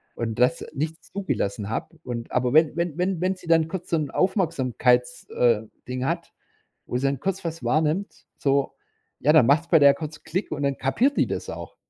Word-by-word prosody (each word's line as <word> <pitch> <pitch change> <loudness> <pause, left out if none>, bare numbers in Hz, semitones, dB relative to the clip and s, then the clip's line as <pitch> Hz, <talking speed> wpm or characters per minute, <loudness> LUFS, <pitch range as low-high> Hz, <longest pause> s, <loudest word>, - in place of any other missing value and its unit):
und 115 0 -3
das 125 +7 +2
nicht 160 +3 -4
zugelassen 110 - -3
hab, 115 - -4
und 115 -1 -5
aber 125 -1 +1
wenn 155 0 +4
wenn 170 -2 -2
wenn 180 -1 -1
wenn 185 +1 +1
sie 180 -2 -15
dann 165 -1 +4
kurz 185 -1 -6
so 165 - +2
'n 150 -3 -2
Aufmerksamkeits 130 - +1
äh, 115 -3 +2 0.3
Ding 125 +1 -3
hat, - - -3 0.5
wo 125 - -1
sie 135 - -2
dann 135 -2 -1
kurz 190 -1 -2
was 165 0 -4
wahrnimmt, 160 +6 0
so, 140 -2 +1 0.5
ja, 150 - +3
dann 155 -7 +7
macht's 150 +5 +3
bei 165 - +6
der 140 -1 +7
kurz 155 -1 -8
Klick 185 +5 -3
und 145 -2 -3
dann 140 -1 0
kapiert 230 - +1
die - - +3
das - - -4
auch. - - -8
150 Hz, 200 wpm, -24 LUFS, 125-170 Hz, 0.5 s, dann